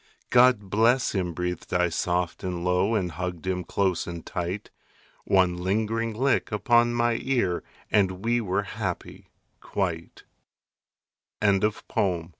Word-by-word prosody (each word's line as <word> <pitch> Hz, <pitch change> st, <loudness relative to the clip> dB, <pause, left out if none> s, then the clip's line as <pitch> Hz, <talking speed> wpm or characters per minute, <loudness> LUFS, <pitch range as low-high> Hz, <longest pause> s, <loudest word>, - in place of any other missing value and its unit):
"God 120 Hz, -6 st, +4 dB
bless 120 Hz, +4 st, +3 dB
him," 90 Hz, -4 st, -1 dB
breathed 90 Hz, 0 st, -4 dB
I 90 Hz, 0 st, +3 dB
soft 90 Hz, 0 st, -1 dB
and 90 Hz, -2 st, -3 dB
low, 90 Hz, +5 st, +2 dB
And 90 Hz, -5 st, 0 dB
hugged 90 Hz, +1 st, -5 dB
him 90 Hz, -1 st, -1 dB
close 95 Hz, -1 st, 0 dB
and 85 Hz, -1 st, -6 dB
tight. 90 Hz, +4 st, -4 dB, 0.5 s
One 90 Hz, -2 st, +3 dB
lingering 110 Hz, +5 st, -1 dB
lick 130 Hz, +2 st, +1 dB
upon 120 Hz, +3 st, +3 dB
my 120 Hz, -1 st, +1 dB
ear 120 Hz, -10 st, 0 dB, 0.3 s
And 95 Hz, -1 st, +1 dB
we 120 Hz, +1 st, +2 dB
were 100 Hz, -1 st, 0 dB
happy 95 Hz, -2 st, -5 dB, 0.3 s
quite. 85 Hz, -4 st, -4 dB, 1.2 s
ANONYMOUS. 100 Hz, -4 st, 0 dB
95 Hz, 125 wpm, -26 LUFS, 90-110 Hz, 1.2 s, God